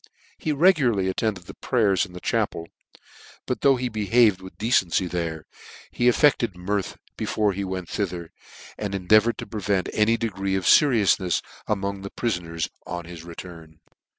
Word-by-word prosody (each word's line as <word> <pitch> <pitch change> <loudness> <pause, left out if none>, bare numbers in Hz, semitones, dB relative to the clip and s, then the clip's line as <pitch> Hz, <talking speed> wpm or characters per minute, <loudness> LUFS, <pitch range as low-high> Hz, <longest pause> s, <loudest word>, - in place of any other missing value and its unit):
He 155 - -1
regularly 140 - +3
attended 95 -1 -2
the - - -10
prayers 105 -7 +1
in 90 - -17
the 90 - -8
cha - - +1
pel, 85 - -8 0.8
but - - -3
though 135 -1 +5
he 125 0 -2
behaved 110 -2 +3
with 95 0 -12
decency 95 -5 +2
there, 85 -3 -4 0.5
he 120 - +1
affected 125 - +3
mirth 100 +2 -3 0.2
before 105 -2 0
he 100 +1 -3
went 95 -2 -4
thither, 90 -4 -4 0.5
and 100 -2 -3
en 95 -2 -5
deavoured 110 +3 +5
to - - -6
prevent 100 -3 -1
any 110 +2 +3
degree 95 -4 -2
of 95 - -2
feriouinefs 105 - +4 0.2
among 100 -1 -1
the 100 - -6
other - - -14
prifoners 85 -8 -2 0.2
on 85 -1 -5
their 90 +1 -9
return. 85 -1 -11
100 Hz, 165 wpm, -24 LUFS, 90-115 Hz, 0.8 s, though